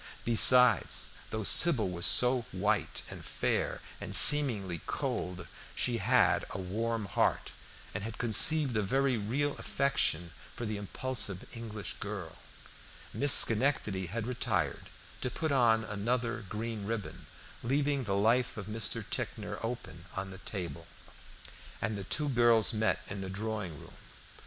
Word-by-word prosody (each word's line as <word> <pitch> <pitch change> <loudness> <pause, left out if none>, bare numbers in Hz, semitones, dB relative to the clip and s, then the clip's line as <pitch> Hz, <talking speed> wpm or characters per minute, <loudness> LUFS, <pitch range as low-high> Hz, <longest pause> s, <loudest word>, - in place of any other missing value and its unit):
Besides, 120 0 +5 0.2
though 110 0 -5
Sybil 125 - +6
was 85 -1 0
so 125 +7 +4
white - - -2
and - - -10
fair, - - -3 0.2
and - - -2
seemingly 110 - +7
cold, 90 -2 -5 0.3
she 120 -2 -1
had 125 +5 +2
a - - -7
warm 110 +4 -4
heart, 100 - -2 0.4
and 95 - -5
had 115 +1 -7
conceived 125 +4 +4
a 105 - 0
very 135 +6 -1
real 130 +7 -3
affection 135 -11 -1 0.2
for 120 - -6
the 105 -1 -5
impulsive 105 -2 -3
English 110 -3 -8
girl. 100 -5 -8 0.8
Miss 145 0 +3
Schenectady 110 -8 +4
had 110 +5 -5
retired 120 -7 -3 0.3
to 125 - -2
put 155 +5 -4
on 115 -4 +2
another 115 +2 -4
green 110 0 -6
ribbon, 115 -2 -7 0.3
leaving 140 +1 -2
the 100 -1 -2
life 115 +5 0
of 105 - -7
Mr. 110 0 -2
Ticknor - - -6
open 100 -8 -7
on 95 0 -6
the 95 - -12
table, 85 -4 -7 0.9
and 110 - -4
the 100 -2 -7
two 150 +7 -2
girls 120 -4 +2
met 110 0 -1
in 100 -1 -7
the 95 - -7
drawing 100 -5 -6
room. - - -15
110 Hz, 140 wpm, -29 LUFS, 100-125 Hz, 0.9 s, seemingly